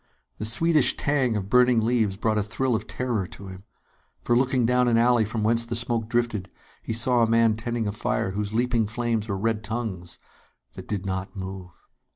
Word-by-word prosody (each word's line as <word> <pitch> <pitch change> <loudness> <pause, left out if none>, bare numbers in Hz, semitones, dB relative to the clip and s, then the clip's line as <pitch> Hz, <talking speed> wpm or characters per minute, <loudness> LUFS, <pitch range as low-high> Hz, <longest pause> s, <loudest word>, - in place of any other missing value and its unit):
The 110 - -3
sweetish 150 +6 +3
tang 135 -5 +1
of 100 -2 -3
burning 125 +1 +4
leaves 110 -5 +1
brought 110 0 0
a - - +2
thrill 125 +5 -1
of 110 - -4
terror 120 -7 -2
to 100 - -12
him; 95 +1 -11 0.6
for, 120 - +2
looking 130 -1 +2
down 125 +1 +3
an 115 -1 +3
alley 120 -1 +4
from 110 +1 -3
whence 115 +2 +2
the 115 - -4
smoke 115 -1 0
drifted, 120 -6 -1 0.3
he - - -6
saw 120 +2 +2
a 115 - +4
man 115 -1 +3
tending 115 0 -3
a - - -1
fire 115 -1 -2
whose 100 +1 -3
leaping 115 -1 +1
flames 115 -1 -2
were 100 - -1
red 110 +1 -1
tongues 105 -6 -4 0.6
that - - -10
did 100 -2 -3
not 95 +1 -4
move. 95 -1 -7
115 Hz, 195 wpm, -25 LUFS, 105-120 Hz, 0.6 s, burning